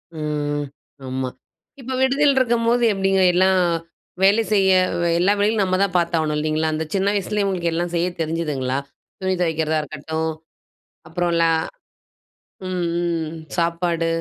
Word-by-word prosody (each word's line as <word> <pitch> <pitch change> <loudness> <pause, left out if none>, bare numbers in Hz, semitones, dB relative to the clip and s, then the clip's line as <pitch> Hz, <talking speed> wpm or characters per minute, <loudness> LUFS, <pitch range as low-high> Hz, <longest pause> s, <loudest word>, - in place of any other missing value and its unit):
ம். 145 -1 -2 0.4
ஆமா. 130 0 -2 0.5
இப்ப 260 +1 -5
விடுதியில 275 +2 +3
இருக்கும்போது 240 -1 +2
எப்டிங்க, 195 -1 +1
எல்லாம் 185 +1 +4 0.6
வேலை 205 +4 +5
செய்ய 195 -2 +4 0.5
எல்லா 190 +4 +4
வேலைகளும் 210 0 +2
நம்ம 185 -1 +1
தான் 190 -2 -2
பார்த்து 170 -1 +1
ஆகணும் 155 -1 -1
இல்லைங்களா? 155 +1 0
அந்த 160 +1 -2
சின்ன 195 +1 +2
வயசுலேயே 205 +1 -1
உங்களுக்கு 175 -3 -1
எல்லாம் 175 +1 -2
செய்ய 170 +1 +1
தெரிஞ்சுதுங்களா? 150 -5 -2 0.4
துணி 190 0 0
துவைக்கிறதா 160 -2 0
இருக்கட்டும், 160 +2 -3 0.8
அப்புறம் 175 +1 -1
ல - - +5 1.2
ம், 185 -1 -2 0.2
ம், 165 -2 -2 0.2
சாப்பாடு? 170 0 0
170 Hz, 130 wpm, -21 LUFS, 160-195 Hz, 1.2 s, வேலை